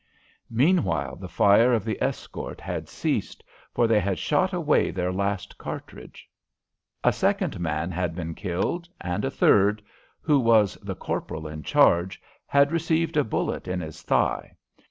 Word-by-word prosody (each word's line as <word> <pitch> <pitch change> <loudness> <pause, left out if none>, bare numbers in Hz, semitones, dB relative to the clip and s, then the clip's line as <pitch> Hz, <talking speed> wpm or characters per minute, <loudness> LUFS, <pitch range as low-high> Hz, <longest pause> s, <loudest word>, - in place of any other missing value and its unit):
Meanwhile 95 - +1
the 90 -1 -8
fire 105 +7 +5
of 110 -4 0
the 110 -3 -3
escort - - -4
had - - -5
ceased, - - -3 0.3
for 120 - +2
they 115 -2 +4
had 95 -1 -1
shot 185 +6 +1
away 165 -5 +2
their 90 +1 -2
last 100 0 -3
cartridge. - - -9 0.8
A - - +4
second - - 0
man 80 0 -2
had 90 -2 -2
been 85 -2 -4
killed, 100 - -3
and 90 +3 -3
a 135 - 0
third 105 -4 +3 0.4
who 150 -3 +2
was 115 -5 +4
the - - -5
corporal 80 0 -4
in 75 0 -7
charge 85 +5 +3 0.3
had 140 +1 +4
received 165 0 0
a 150 - +4
bullet 110 - -2
in 90 0 -2
his 80 -3 -7
thigh. - - 0
100 Hz, 155 wpm, -25 LUFS, 90-135 Hz, 0.8 s, fire